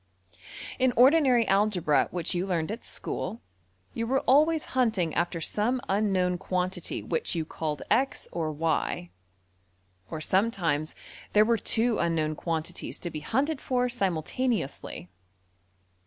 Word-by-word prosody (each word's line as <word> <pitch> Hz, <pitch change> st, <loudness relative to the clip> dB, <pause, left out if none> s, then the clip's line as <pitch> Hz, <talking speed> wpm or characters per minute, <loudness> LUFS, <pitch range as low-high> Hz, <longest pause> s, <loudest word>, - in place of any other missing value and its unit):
png}% 95 Hz, -1 st, -13 dB
In 255 Hz, -1 st, +3 dB
ordinary 255 Hz, -3 st, +5 dB
algebra 195 Hz, -7 st, +3 dB
which 175 Hz, -2 st, -1 dB
you 180 Hz, +2 st, -1 dB
learned 170 Hz, -1 st, -1 dB
at 230 Hz, -, -6 dB
school, 215 Hz, +6 st, -4 dB, 0.5 s
you 230 Hz, 0 st, -2 dB
were 270 Hz, +3 st, +2 dB
always 300 Hz, +4 st, +4 dB
hunting 220 Hz, -11 st, +1 dB
after 170 Hz, 0 st, -1 dB
some 215 Hz, +9 st, 0 dB
unknown 190 Hz, -3 st, +1 dB
quantity 185 Hz, 0 st, -2 dB
which 465 Hz, -, -2 dB
you 160 Hz, -2 st, -1 dB
called 155 Hz, -2 st, -4 dB
$x$ 260 Hz, +6 st, +1 dB
or~$y$; 155 Hz, -, -1 dB, 1.0 s
or 160 Hz, -, -4 dB
sometimes 170 Hz, -5 st, 0 dB, 0.4 s
there 210 Hz, +1 st, +6 dB
were 230 Hz, +1 st, +3 dB
two 225 Hz, +2 st, +2 dB
unknown 160 Hz, -2 st, +1 dB
quantities 165 Hz, +2 st, -4 dB
to 175 Hz, -, -5 dB
be 155 Hz, -, -5 dB
hunted 270 Hz, -, -1 dB
for 250 Hz, -1 st, +1 dB
simultaneously. 195 Hz, -, -2 dB
185 Hz, 125 wpm, -28 LUFS, 160-240 Hz, 1.0 s, there